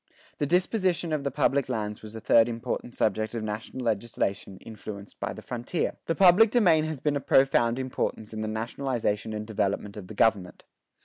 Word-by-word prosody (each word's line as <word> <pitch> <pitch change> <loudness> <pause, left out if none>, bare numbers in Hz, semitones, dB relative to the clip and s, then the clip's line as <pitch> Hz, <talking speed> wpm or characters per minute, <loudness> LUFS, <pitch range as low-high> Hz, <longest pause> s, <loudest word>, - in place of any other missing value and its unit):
The 145 - 0
disposition 180 -1 +1
of 150 -2 -1
the 140 - 0
public 140 -1 +1
lands 105 -3 -3
was 110 0 -10
a - - -5
third 115 +1 +4
important 115 +1 -4
subject 110 +2 0
of 115 - -3
national 110 +4 -5
legislation 100 -3 -2
influenced 105 -2 -10
by - - -2
the - - -9
frontier. 125 +8 -2
The 165 - +1
public 195 +4 +6
domain 175 -10 +4
has 155 -3 -4
been 150 +2 0
a - - +1
force - - -15
of - - -35 0.2
profound 115 0 +2
importance 125 -4 -3
in 110 - -4
the 110 - -2
nationalization 110 -1 -2
and 105 0 -4
development 105 -1 -2
of 95 -3 -8
the 110 - -9
government. 100 -5 +1
115 Hz, 195 wpm, -27 LUFS, 110-140 Hz, 0.2 s, public